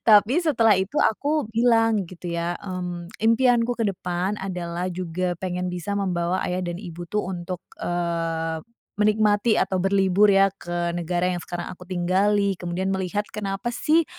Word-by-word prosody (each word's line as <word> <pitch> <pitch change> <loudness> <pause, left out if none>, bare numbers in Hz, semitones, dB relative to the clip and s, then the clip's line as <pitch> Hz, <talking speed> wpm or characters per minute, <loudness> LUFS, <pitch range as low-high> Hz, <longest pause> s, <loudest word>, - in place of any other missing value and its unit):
Tapi 220 +8 +6
setelah 255 -10 +4
itu 190 +8 0
aku 290 +7 +1
bilang, 225 -2 +3
gitu, 175 -1 -7
ya, 170 +1 -1
mmm, 180 -2 -5
impianku 235 +1 +3
ke 230 - 0
depan 185 0 -2
adalah 180 -2 -3
juga 180 0 -2
pengen 180 0 -3
bisa 180 +3 -4
membawa 185 -2 0
ayah 180 +1 -1
dan 175 +1 -4
ibu, 175 -3 -7
tuh, 210 +2 -2
untuk, 180 -1 -5 0.2
eee, 165 -2 -2 0.4
menikmati 210 +1 +3
atau 190 -1 +1
berlibur, 195 +1 +4
ya, 195 -1 +5
ke 175 -2 -3
negara 175 +1 -1
yang 175 - -3
sekarang 175 0 -5
aku 180 0 -13
tinggali, 195 +3 +2
kemudian 180 +2 -2
melihat 190 +2 -1
kenapa, 200 +2 -3
sih, 320 +7 +3
185 Hz, 150 wpm, -24 LUFS, 175-210 Hz, 0.4 s, Tapi